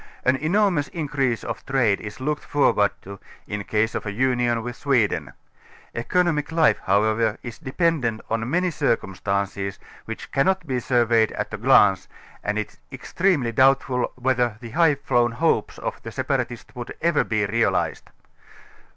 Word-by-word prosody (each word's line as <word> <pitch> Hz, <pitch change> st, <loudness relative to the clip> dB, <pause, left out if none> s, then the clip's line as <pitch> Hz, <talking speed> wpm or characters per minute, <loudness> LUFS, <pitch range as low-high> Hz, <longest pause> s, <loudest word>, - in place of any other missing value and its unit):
An 130 Hz, -, +4 dB
enormous 175 Hz, 0 st, +1 dB
increase 140 Hz, -8 st, -1 dB
of -, -, -5 dB
trade 120 Hz, -7 st, +1 dB
is 105 Hz, +2 st, -8 dB
looked 150 Hz, +3 st, -2 dB
forward 105 Hz, -8 st, +3 dB
to, 100 Hz, 0 st, -9 dB, 0.3 s
in 105 Hz, -1 st, -4 dB
case 110 Hz, +2 st, 0 dB
of -, -, -3 dB
a 105 Hz, -, -4 dB
union 120 Hz, 0 st, +1 dB
with 120 Hz, 0 st, -5 dB
Sweden. 110 Hz, -, 0 dB, 0.6 s
Economic 155 Hz, +4 st, 0 dB
life 160 Hz, -1 st, +3 dB
however 110 Hz, +3 st, +2 dB
is 120 Hz, -2 st, -8 dB
dependent 135 Hz, -6 st, 0 dB
on 115 Hz, +1 st, -2 dB
many 180 Hz, +4 st, +1 dB
circumstances, 100 Hz, -, -1 dB, 0.3 s
which 115 Hz, -, -7 dB
cannot 185 Hz, +6 st, +1 dB
be 130 Hz, -4 st, -1 dB
surveyed 115 Hz, -3 st, +2 dB
at -, -, -4 dB
a -, -, -2 dB
glance, -, -, +4 dB, 0.4 s
and 105 Hz, +1 st, -1 dB
it 110 Hz, -, -2 dB
is -, -, -25 dB
extremely 140 Hz, 0 st, 0 dB
doubtful 130 Hz, 0 st, +2 dB
whether 125 Hz, -3 st, 0 dB
the 115 Hz, -2 st, -9 dB
high 165 Hz, -1 st, +4 dB
flown 120 Hz, -4 st, +1 dB
hopes 165 Hz, +7 st, 0 dB
of -, -, -5 dB
the 115 Hz, -, -8 dB
separatists 130 Hz, -2 st, -3 dB
would 120 Hz, -2 st, -7 dB
ever 170 Hz, -2 st, +2 dB
be 110 Hz, -1 st, 0 dB
realized. 115 Hz, +3 st, 0 dB
125 Hz, 150 wpm, -23 LUFS, 110-145 Hz, 0.6 s, An